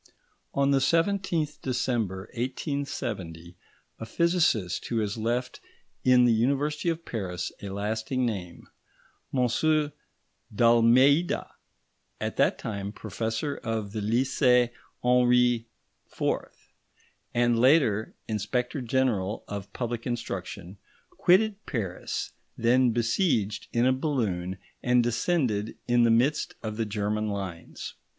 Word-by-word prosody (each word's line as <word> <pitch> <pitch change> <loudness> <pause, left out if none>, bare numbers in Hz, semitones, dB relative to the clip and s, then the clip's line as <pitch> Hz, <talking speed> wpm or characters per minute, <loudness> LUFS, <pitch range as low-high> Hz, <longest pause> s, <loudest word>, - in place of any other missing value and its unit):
On 140 0 +3
the 135 - +4
17th 165 +1 +1
December 120 -7 -1
1870, 120 - -4 0.4
a 115 - -5
physicist 135 - +1
who 120 - -2
has 105 -2 -1
left 120 +3 -2 0.4
in 125 -1 +6
the 120 - +4
University 140 +8 +1
of 165 0 -3
Paris 90 -6 -4
a 100 - -5
lasting 110 +6 -2
name, 95 -7 -5 0.6
M. 145 +4 +2 0.6
d'Almeida, 120 - +4 0.7
at - - -3
that - - +3
time 100 -2 -4
Professor 110 +6 -3
at 110 -3 -3
the 110 - -4
Lycée 125 +2 +3 0.3
Henri 125 -1 +3 0.5
IV. - - -3 0.6
and 120 -1 +3
later 125 -5 +3
Inspector 125 +6 -2
General 115 -5 0
of 100 -1 -6
Public 120 -1 -4
Instruction, 100 -5 -5 0.3
quitted 210 +3 +3
Paris, 100 - -3 0.3
then 125 +2 +4
besieged, 115 - 0
in 120 +1 +2
a 130 - +4
balloon, 105 - -1 0.2
and 125 -1 +3
descended 115 - 0
in 120 0 +4
the 120 - +5
midst 125 +7 +2
of 110 -1 -4
the 115 -2 -1
German 105 +1 -1
lines. 95 -5 -5
120 Hz, 110 wpm, -27 LUFS, 105-130 Hz, 0.7 s, in